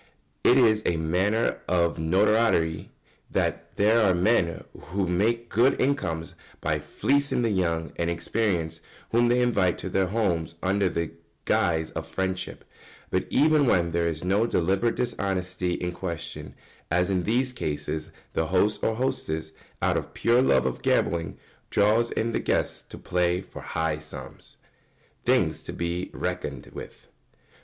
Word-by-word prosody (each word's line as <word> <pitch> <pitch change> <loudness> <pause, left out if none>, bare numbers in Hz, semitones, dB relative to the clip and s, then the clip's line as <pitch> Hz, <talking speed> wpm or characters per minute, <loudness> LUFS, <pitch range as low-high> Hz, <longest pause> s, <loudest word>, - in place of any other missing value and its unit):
It 125 - +6
is 110 -4 +5
a 85 - +1
matter 95 +8 +1
of 85 -2 +1
notoriety 90 -1 +2 0.4
that - - -2
there 110 +3 +4
are 95 -4 +4
men 90 -2 +2
who 95 +1 -3
make 115 +7 +1
good 120 +5 +3
incomes 85 -13 -1 0.3
by - - 0
fleecing 140 -3 0
the 115 - +1
young 85 -4 -1
and 85 0 0
inexperienced 85 -2 -1 0.3
whom 120 +1 +4
they 120 +1 +3
invite 100 -8 +2
to 95 - -5
their 95 0 +1
houses 90 -6 -1
under 95 0 +2
the 85 -2 -2 0.3
guise 80 -2 +1
of 80 0 -5
friendship; 95 +2 -3 0.5
but - - 0
even 155 -2 +4
when 85 -6 +3
there 85 0 +1
is 80 -1 -3
no 100 +5 +2
deliberate 95 +6 +1
dishonesty 90 -6 -1
in 90 0 -2
question, 85 -2 -6 0.3
as 90 +3 +2
in 95 -2 +1
these 125 +6 0
cases, 75 -4 -3 0.2
the 80 - 0
host 95 +5 +1
or 110 - +1
hostess, 80 -11 -2 0.3
out - - +3
of - - -5
pure 120 +2 +3
love 130 - +3
of - - -2
gambling, 80 -3 0 0.3
draws 110 +3 +3
in 115 +1 -1
the - - 0
guests - - 0
to - - -12
play 90 0 0
for 95 - -10
high 80 -2 -2
sums. 75 0 -10 0.7
[Sidenote: - - -36 0.2
Things - - -5
to - - -7
be 85 +1 -3
reckoned 90 -7 -4
with. - - -10
90 Hz, 150 wpm, -26 LUFS, 85-110 Hz, 0.7 s, It